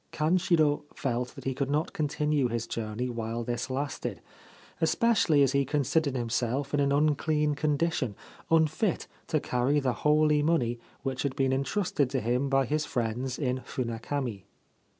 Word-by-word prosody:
Kanshiro 155 -2 +2
felt 125 -2 -2
that - - -10
he 135 - -1
could 135 +1 -2
not 150 +2 0
continue 150 -2 +1
his 115 -1 -2
journey 115 +1 -3
while 115 -1 -3
this 120 +2 -3
lasted, 140 +2 -3 0.6
especially 165 -4 +3
as 135 - +3
he 140 0 +2
considered 145 +1 0
himself 125 +3 -1
in 145 - +2
an 140 -1 +2
unclean 150 +1 +2
condition, 145 -5 0 0.3
unfit 165 +4 +2 0.2
to 155 - +1
carry 130 +3 +1
the 130 -3 0
holy 150 0 +4
money 130 -7 +1 0.2
which 130 -2 -2
had 140 -2 -2
been 135 -2 +1
entrusted 140 0 0
to 135 0 0
him 125 +4 0
by 135 0 +3
his 150 +5 0
friends 125 -1 -2
in 130 -3 -1
Funakami. 120 -3 -4
140 Hz, 150 wpm, -28 LUFS, 125-150 Hz, 0.6 s, holy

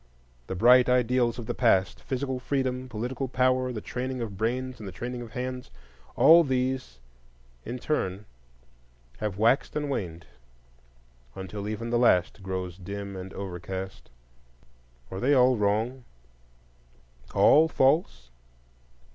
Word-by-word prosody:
The 95 - -4
bright 125 +6 +6
ideals 125 -1 +2
of 120 - -6
the - - -3
past,—physical 125 +5 0
freedom, 130 -1 -2
political 125 +3 -3
power, 130 0 +1
the 110 -4 -5
training 130 +3 -4
of 110 -4 -5
brains 125 +4 -2
and 105 - -8
the - - -6
training 120 +5 -5
of 115 -2 -10
hands,—all 125 - +2
these 130 - -2 0.7
in 120 +2 -4
turn 105 -8 -2 0.9
have 105 -3 -3
waxed 115 +6 +2
and 150 -1 -2
waned, 85 -9 -4 1.1
until 100 +2 -6
even 115 +2 -4
the 120 - +2
last 95 -5 +3
grows 95 -1 -5
dim 100 +1 -6
and 95 0 -7
overcast. 95 0 -6 1.0
Are 95 - -5
they 140 +6 +3
all 125 0 +5
wrong,—all - - -1
false? 135 - +1
115 Hz, 120 wpm, -27 LUFS, 95-130 Hz, 1.1 s, bright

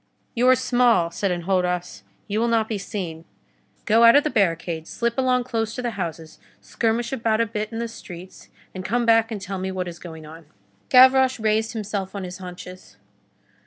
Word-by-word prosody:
"You 245 +1 +2
are 255 - +7
small," 245 -9 +2
said 195 +3 -1
Enjolras, 180 - -1 0.3
"you 210 +2 -1
will 235 - +1
not 225 -2 +1
be 215 -3 -3
seen. 180 -5 -6 0.6
Go 225 +1 +4
out 230 +2 +8
of 285 - +6
the 305 - -1
barricade, 165 -4 0
slip 235 0 -2
along 255 -1 +1
close 225 -2 -3
to 250 - -5
the 240 - -1
houses, 165 -5 -6 0.2
skirmish 230 +2 -1
about 225 -3 0
a 230 - +3
bit 215 0 -4
in 225 - -5
the 235 0 -2
streets, 185 -5 -11 0.2
and 185 - -6
come 240 +4 0
back 225 -1 +4
and 215 - -4
tell 190 0 -5
me 190 0 -3
what 185 -1 -3
is 170 -1 -8
going 160 -3 -10
on." 160 0 -13 0.4
Gavroche 260 0 +6
raised 220 +1 0
himself 205 -3 -4
on 200 - -4
his 180 0 -7
haunches. 180 - -10
210 Hz, 195 wpm, -23 LUFS, 180-230 Hz, 0.6 s, out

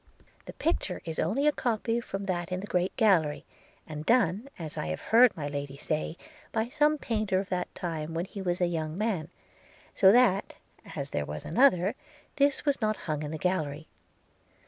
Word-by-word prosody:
The - - -7
picture 255 - -1
is 160 -1 -4
only 225 - +1
a 300 - +6
copy 230 -3 -1
from 195 -3 -5
that 175 -2 -2
in 180 - -1
the 195 - -5
great 180 -2 0
gallery, 180 -10 +3 0.4
and 150 -1 -6
done, 230 - +2
as 160 -3 -7
I - - -3
have 80 0 -3
heard 235 0 +5
my 145 -2 -3
Lady 140 -1 -5
say, 155 +3 -3 0.3
by 225 +1 -1
some 300 +3 +3
painter 215 -8 0
of 195 - -5
that 180 -1 -1
time 165 -2 -4
when 170 +2 -1
he 200 0 -8
was 180 -1 -1
a 180 - +3
young 160 -2 -2
man 195 -7 -1 0.3
– - - -27
so 190 - +6
that, 230 -4 +3 0.4
as - - -4
there 75 0 -2
was 75 +1 -6
another, 195 - +4 0.4
this 280 0 +2
was 285 -3 +1
not 215 -1 +1
hung 150 -2 -2
in 150 - -4
the 160 - -4
gallery. 155 -3 -2
185 Hz, 190 wpm, -29 LUFS, 160-225 Hz, 0.4 s, a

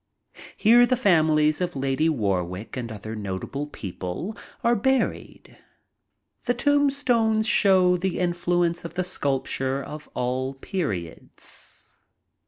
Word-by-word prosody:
Here 240 +3 +6
the 255 - +2
famiHes 155 - +3
of 175 -2 -2
Lady 135 +4 +1
Warwick 100 - -2
and 120 -3 -5
other 110 +1 -6
notable 105 +8 -4
people 95 - -6 0.3
are 235 0 +4
buried. 265 +5 -1 0.9
The 245 - +1
tombstones 250 -6 +2
show 185 -4 +4
the 185 0 -2
influence 175 -1 0
of 170 0 -8
the 185 - 0
sculpture 135 -5 -2
of 150 0 -9
all 130 +2 -2
periods. 135 - -6
160 Hz, 110 wpm, -25 LUFS, 130-200 Hz, 0.9 s, Here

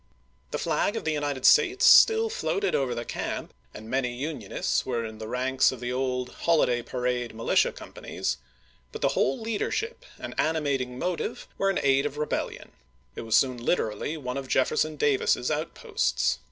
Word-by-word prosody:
The - - -3
flag 205 - 0
of - - -3
the 160 - +1
United 145 -3 -2
States 385 +7 +5
still 450 -2 +7
floated 435 -3 -1
over 130 -3 0
the 120 0 -4
camp - - -4 0.2
and 110 +8 -10
many 125 +1 0
Unionists 130 -6 -2
were 120 -3 -2
in 110 -1 -8
the 110 - -6
ranks 130 +2 +2
of 130 - -8
the 125 +1 -3
old 125 -1 -1
holiday 140 -8 +1
parade 125 -1 -2
militia 115 - +2
companies, - - -5 0.5
but - - -7
the - - +4
whole 135 - +1
leadership 230 - -3
and - - -7
animating 140 -6 0
motive 180 +5 -3
were 195 - +2
in 195 - 0
aid 135 +1 +3
of 145 0 -8
rebellion: 150 0 -3 0.4
it - - -5
was 110 +1 +4
already 130 -3 -6
literally 145 +2 -1
one 125 -3 -4
of 135 -1 -5
Jefferson 155 +4 +1
Davis's 140 -2 +1
outposts. 155 +2 -1
135 Hz, 165 wpm, -27 LUFS, 125-155 Hz, 0.5 s, still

